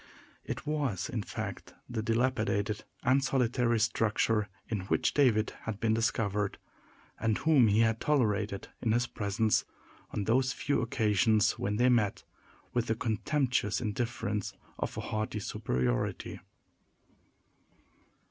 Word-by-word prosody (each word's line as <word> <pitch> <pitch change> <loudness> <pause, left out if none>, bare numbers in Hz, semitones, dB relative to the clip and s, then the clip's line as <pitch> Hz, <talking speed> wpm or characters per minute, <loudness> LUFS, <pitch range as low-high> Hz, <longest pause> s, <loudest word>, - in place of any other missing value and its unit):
It - - -5
was, 145 -10 -1
in - - -2
fact, - - -6
the 115 -2 -3
dilapidated 110 -2 0 0.2
and 130 +2 +3
solitary 125 -3 +2
structure 110 -1 +1 0.2
in 110 -3 -2
which - - +1
David 115 -7 +3
had 110 -2 -4
been 110 -1 +2
discovered, 105 -3 0 0.6
and 110 -1 +1
whom 150 -7 +5
he 105 +2 +4
had 115 0 +2
tolerated 105 -8 +1
in 110 -2 +1
his 120 +1 +2
presence, 105 -1 +1 0.5
on 105 - -2
those 130 +5 +2
few 140 - 0
occasions 110 -1 +3
when 100 +1 -1
they 120 +3 +3
met, 110 -5 +2 0.5
with 120 -1 0
the 115 - +1
contemptuous 120 0 0
indifference 105 -2 -2 0.3
of - - -3
a - - -2
haughty 110 0 -2
superiority. 65 -10 -2
110 Hz, 125 wpm, -31 LUFS, 105-120 Hz, 0.6 s, whom